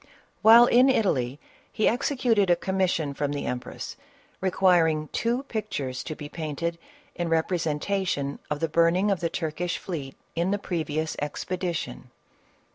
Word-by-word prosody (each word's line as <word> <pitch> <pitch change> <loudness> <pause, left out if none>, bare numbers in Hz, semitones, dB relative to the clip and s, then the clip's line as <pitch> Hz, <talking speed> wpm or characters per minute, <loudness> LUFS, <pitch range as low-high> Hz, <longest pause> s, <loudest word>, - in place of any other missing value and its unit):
While 230 +2 +9
in 250 +2 +5
Italy, 145 - +1 0.3
he 215 - +1
executed 235 -5 +2
a 175 - +6
commission 175 -4 0
from 145 +1 -2
the 145 - -3
empress 125 0 -5 0.4
requiring 175 -5 +3
two 240 +3 -1
pictures 170 - -4
to 155 - -4
be 145 -1 -7
painted 165 +2 -4 0.3
in 175 -1 -3
representation 160 -2 0
of 150 0 -2
the 165 - +2
burning 170 +5 +3
of 195 - 0
the 170 - -1
Turkish 170 +2 -2
fleet 145 -7 -6 0.2
in 170 +2 +1
the 205 - +1
previous 160 -5 -2
expedition. 170 - -4
170 Hz, 135 wpm, -26 LUFS, 150-195 Hz, 0.4 s, While